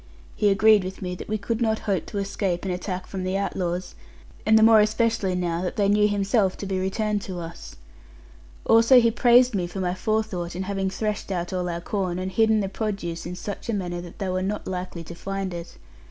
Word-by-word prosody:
He 210 - +3
agreed 215 0 +5
with 190 +1 -6
me 180 0 -3
that 180 - -8
we 215 - 0
could 220 +3 -3
not 220 -1 +2
hope 195 -6 -1
to 210 - -6
escape 195 -2 -2
an 190 - -1
attack 180 +1 -4
from 190 -1 -5
the 185 +1 -1
outlaws, 180 -2 -2 0.5
and 220 0 +6
the 220 - +5
more 225 -1 +7
especially 215 -2 +1
now 175 -1 -1
that 180 - -3
they 200 -2 +2
knew 210 +1 +4
himself 200 -1 +1
to - - -6
be 190 -1 -1
returned 205 +2 -1
to 185 -2 -6
us. 165 0 -9 0.9
Also 230 +3 +7
he 230 -1 +3
praised 245 +1 +5
me 180 -4 -1
for 175 +3 -6
my 180 -1 0
forethought 190 -4 -2
in 185 - -3
having 195 0 -1
threshed 210 +1 -3
out 175 -1 -3
all 180 -1 -1
our 170 0 -3
corn, 185 -1 -2
and 185 +1 -3
hidden 220 +2 +3
the 195 - -1
produce 190 -5 -4
in 180 - -5
such 205 +5 -6
a - - +1
manner 175 -3 -3
that 175 -1 -11
they 195 -3 -3
were 185 0 -1
not 205 +2 -3
likely 180 -2 -5
to 170 - -9
find 195 +1 -4
it. 170 0 -8
195 Hz, 225 wpm, -25 LUFS, 180-215 Hz, 0.9 s, more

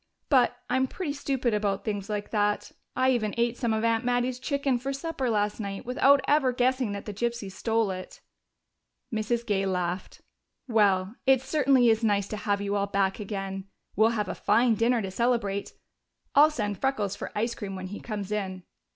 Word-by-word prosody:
But 250 -3 +4
I'm 260 +1 +1
pretty 310 0 -4
stupid 265 -4 -1
about 205 -2 -1
things 205 -2 -3
like 205 -1 -3
that. 210 -1 0 0.2
I 260 +1 +3
even 215 -4 0
ate 235 0 +1
some 235 -2 -1
of 220 0 0
Aunt 230 +1 +2
Mattie's 245 +1 0
chicken 275 -2 0
for 265 +3 -4
my - - -1
supper 275 -3 -2
last 210 -1 0
night 200 -2 -5
without 270 +3 +4
ever 285 -3 +3
guessing 250 -2 +1
that 200 - -6
the 210 - -5
gypsies 235 -2 -3
stole 225 +1 0
it." 185 0 -8 0.9
Mrs. 230 +2 -1
Gay 195 -3 0
laughed. 180 0 -3 0.5
"Well, 200 -4 +2
it 265 -1 +5
certainly 270 -4 +3
is 225 +1 +2
nice 200 -2 +2
to 215 - -4
have 205 -1 -1
you 200 0 -1
all 200 0 0
back 195 0 0
again. 195 -2 -4 0.3
We'll 220 +2 +5
have 210 - -1
a - - -3
fine 230 +2 +3
dinner 230 +1 +2
to 190 - -4
celebrate 225 -3 0 0.6
I'll 295 +2 +7
send 205 -10 -3
Freckles 220 -8 0
for - - -6
ice 230 +3 0
cream 195 -2 -6
when 185 0 -6
he 205 - -6
comes 210 -3 -5
in." 190 -3 -3
220 Hz, 190 wpm, -27 LUFS, 200-250 Hz, 0.9 s, I'll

